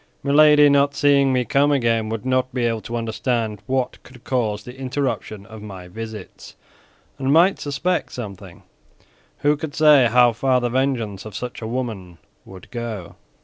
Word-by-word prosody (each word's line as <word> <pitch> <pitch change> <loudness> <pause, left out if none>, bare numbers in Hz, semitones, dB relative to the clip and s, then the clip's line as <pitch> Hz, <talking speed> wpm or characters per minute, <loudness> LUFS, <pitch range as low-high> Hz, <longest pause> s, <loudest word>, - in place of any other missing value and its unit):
Milady, 150 +1 +6
not 140 0 +3
seeing 140 -2 +3
me 125 -1 +1
come 140 +5 +2
again, 115 -5 +1
would 115 +1 -5
not 130 0 0
be 125 -2 0
able 115 -2 -1
to 120 - -6
understand 115 -2 -2
what 130 -1 -2
could 125 -1 -17
cause 110 -5 -1
the 125 +3 -10
interruption 130 -6 -3
of 110 0 -11
my 95 -4 -9
visits, 110 +1 -9 0.6
and 135 0 0
might 170 +6 +4
suspect 165 +6 -2
something; 100 -6 -9 0.8
who 145 +1 +3
could 150 -1 -7
say 150 -5 +6
how 120 -1 +5
far 130 +2 +1
the 120 -1 -1
vengeance 120 -6 -1
of 110 -2 -10
such 125 +2 -6
a 110 - -4
woman 110 -8 -5 0.3
would 95 +2 -13
go?" 115 -8 -6
125 Hz, 165 wpm, -21 LUFS, 110-140 Hz, 0.8 s, Milady